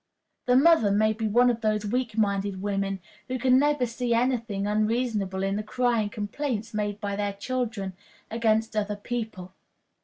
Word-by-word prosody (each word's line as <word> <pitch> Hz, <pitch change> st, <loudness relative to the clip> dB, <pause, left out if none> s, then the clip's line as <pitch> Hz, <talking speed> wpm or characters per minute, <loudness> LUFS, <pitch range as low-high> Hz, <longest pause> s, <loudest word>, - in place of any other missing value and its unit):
The 250 Hz, -, +4 dB
mother 280 Hz, -5 st, +5 dB
may 215 Hz, +2 st, +3 dB
be 220 Hz, 0 st, -2 dB
one 245 Hz, +4 st, +4 dB
of 230 Hz, -1 st, -5 dB
those 215 Hz, -1 st, 0 dB
weak 230 Hz, 0 st, -2 dB
minded 200 Hz, -2 st, 0 dB
women 195 Hz, -1 st, -2 dB, 0.3 s
who 255 Hz, -, -2 dB
can 255 Hz, +1 st, +4 dB
never 290 Hz, -2 st, +2 dB
see 235 Hz, 0 st, -1 dB
any 250 Hz, +2 st, +2 dB
thing 205 Hz, -4 st, -4 dB
unreasonable 210 Hz, -2 st, 0 dB
in 195 Hz, +1 st, 0 dB
the -, -, -1 dB
crying 230 Hz, -1 st, 0 dB
complaints 220 Hz, +2 st, -3 dB
made 210 Hz, -1 st, -2 dB
by 200 Hz, -1 st, -3 dB
their 205 Hz, 0 st, -1 dB
children 220 Hz, -2 st, -3 dB, 0.4 s
against 225 Hz, -1 st, +1 dB
other 210 Hz, -1 st, 0 dB
people. 205 Hz, -4 st, -5 dB
215 Hz, 165 wpm, -26 LUFS, 205-245 Hz, 0.4 s, mother